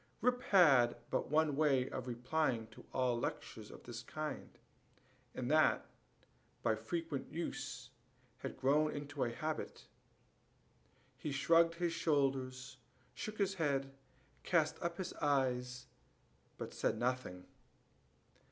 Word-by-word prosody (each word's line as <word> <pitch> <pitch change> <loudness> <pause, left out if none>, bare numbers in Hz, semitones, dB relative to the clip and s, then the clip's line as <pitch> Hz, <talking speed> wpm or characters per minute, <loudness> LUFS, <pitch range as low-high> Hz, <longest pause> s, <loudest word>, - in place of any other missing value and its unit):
Rip 250 +2 +2
had 135 -11 +6 0.2
but - - 0
one 155 -1 +3
way 135 -4 +3
of 130 -1 -5
replying 125 0 0
to - - -13
all 125 -2 +1
lectures 110 -2 -4
of - - -12
the 120 0 -7
kind, 155 0 -4 0.9
and 125 +2 -2
that, 155 0 +4 0.8
by 115 - +3
frequent 155 +6 -4
use, 170 +2 -4 0.5
had - - -5
grown 150 +3 +3
into 145 -1 -3
a 120 - 0
habit. 155 +6 -4 1.3
He 150 - -3
shrugged 165 +4 +4
his 170 -1 0
shoulders, 135 -5 0 0.4
shook 215 0 -5
his 195 -1 +1
head, 140 -6 0 0.5
cast 160 -4 +1
up 170 0 -2
his 185 -1 -4
eyes, 125 -3 0 0.7
but - - -6
said - - 0
nothing. 120 -8 -2
140 Hz, 120 wpm, -36 LUFS, 125-160 Hz, 1.3 s, had